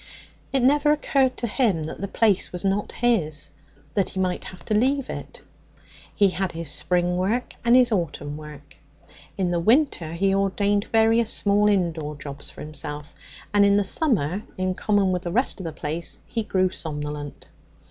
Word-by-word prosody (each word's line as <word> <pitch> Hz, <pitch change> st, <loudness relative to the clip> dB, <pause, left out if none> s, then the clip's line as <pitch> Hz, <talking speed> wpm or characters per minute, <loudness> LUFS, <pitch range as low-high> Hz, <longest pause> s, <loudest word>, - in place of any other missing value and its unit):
It 270 Hz, -, +1 dB
never 290 Hz, +3 st, +4 dB
occurred 275 Hz, -3 st, +1 dB
to -, -, -1 dB
him 210 Hz, -, +1 dB
that 155 Hz, -, -6 dB
the 200 Hz, -, -2 dB
place 205 Hz, -1 st, +2 dB
was 180 Hz, +1 st, -4 dB
not 195 Hz, +1 st, 0 dB
his, 180 Hz, -11 st, 0 dB, 0.4 s
that 200 Hz, -3 st, +1 dB
he 190 Hz, -, -5 dB
might 185 Hz, -1 st, -1 dB
have 185 Hz, -, -11 dB
to 215 Hz, -, -1 dB
leave 265 Hz, +5 st, +1 dB
it. -, -, -8 dB, 0.7 s
He 200 Hz, -1 st, +4 dB
had 190 Hz, 0 st, -2 dB
his 165 Hz, -3 st, -3 dB
spring 180 Hz, +2 st, +1 dB
work 215 Hz, +7 st, -1 dB
and 235 Hz, +1 st, +5 dB
his 250 Hz, -2 st, +5 dB
autumn 150 Hz, -6 st, -2 dB
work; 150 Hz, -2 st, -11 dB, 0.6 s
in 185 Hz, -3 st, 0 dB
the 175 Hz, -, +1 dB
winter 220 Hz, -, +2 dB
he 195 Hz, +3 st, +1 dB
ordained 200 Hz, +1 st, +1 dB
various 225 Hz, 0 st, +3 dB
small 205 Hz, +1 st, +3 dB
indoor 165 Hz, -6 st, 0 dB
jobs 140 Hz, 0 st, -8 dB
for -, -, -11 dB
himself; 150 Hz, -1 st, -6 dB, 0.4 s
and 205 Hz, -1 st, +5 dB
in 200 Hz, 0 st, +5 dB
the 205 Hz, -, +3 dB
summer, 195 Hz, -, 0 dB, 0.2 s
in 185 Hz, 0 st, 0 dB
common 200 Hz, 0 st, +1 dB
with 180 Hz, -1 st, -1 dB
the 175 Hz, -, -4 dB
rest 245 Hz, +4 st, +1 dB
of 180 Hz, -, -5 dB
the -, -, -4 dB
place, 155 Hz, +2 st, -5 dB
he 230 Hz, -, -3 dB
grew 185 Hz, -3 st, +1 dB
somnolent. 150 Hz, -3 st, -5 dB
190 Hz, 180 wpm, -24 LUFS, 165-220 Hz, 0.7 s, and